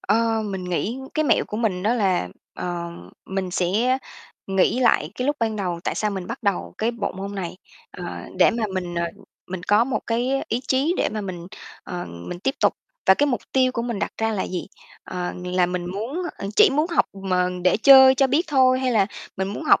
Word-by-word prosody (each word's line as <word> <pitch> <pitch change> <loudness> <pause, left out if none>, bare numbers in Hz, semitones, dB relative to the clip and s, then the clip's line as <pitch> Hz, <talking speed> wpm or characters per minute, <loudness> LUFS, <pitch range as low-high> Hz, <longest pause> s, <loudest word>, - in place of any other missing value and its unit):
Ờ, 225 +1 +1
mình 190 -3 -4
nghĩ 200 +8 -2 0.2
cái 310 - +1
mẹo 255 - +3
của 210 - -6
mình 200 -6 0
đó 225 +4 +2
là, 190 - +1 0.3
ờ, 175 -1 -4 0.4
mình 190 -1 -3
sẽ 215 +9 +1 0.5
nghĩ 195 +6 +2
lại 240 - +3
cái 250 - -2
lúc 290 - +1
ban 220 -1 0
đầu 180 -4 -2
tại - - -1
sao 210 -1 0
mình 190 -2 -4
bắt 235 +3 -6
đầu 200 -3 -1
cái 225 +2 +1
bộ 230 -4 -3
môn 195 +2 -6
này, 180 -2 -4 0.3
ờ, - - -8 0.3
để - - +6
mà 230 -1 -1
mình, 175 -2 -3
ờ, 170 0 0 0.4
mình 185 -1 -6
có 205 +4 +4
một 245 -4 -1
cái 240 +3 0 0.2
ý 235 +3 0
chí 275 +6 +2
để - - +1
mà 215 0 -4
mình, 180 -3 -6 0.4
ờ, 180 -1 -5
mình 85 - -7
tiếp 270 +7 0
tục. - - +4 0.3
Và, 190 - +8
cái, 290 - +2
mục 250 -4 0
tiêu 255 -1 +3
của 235 - -2
mình 235 -4 -3
đặt - - -2
ra 225 0 +1
là 200 - -1
gì? 180 -2 -4 0.4
Ờ, 180 -1 -4
là 180 0 +2
muốn, 195 - -3 0.2
à 195 - -4
chỉ - - +7
muốn 300 +3 +1
học 335 - +3
mà 185 -2 0 0.2
để 180 - +4
chơi 265 +3 +8
cho 270 +1 +4
biết 305 +7 +1
thôi 260 -2 +4
hay 255 -1 +1
là 200 -4 +4 0.3
mình 190 0 -1
muốn 210 +10 -5
học - - +5
210 Hz, 220 wpm, -23 LUFS, 185-250 Hz, 0.5 s, Và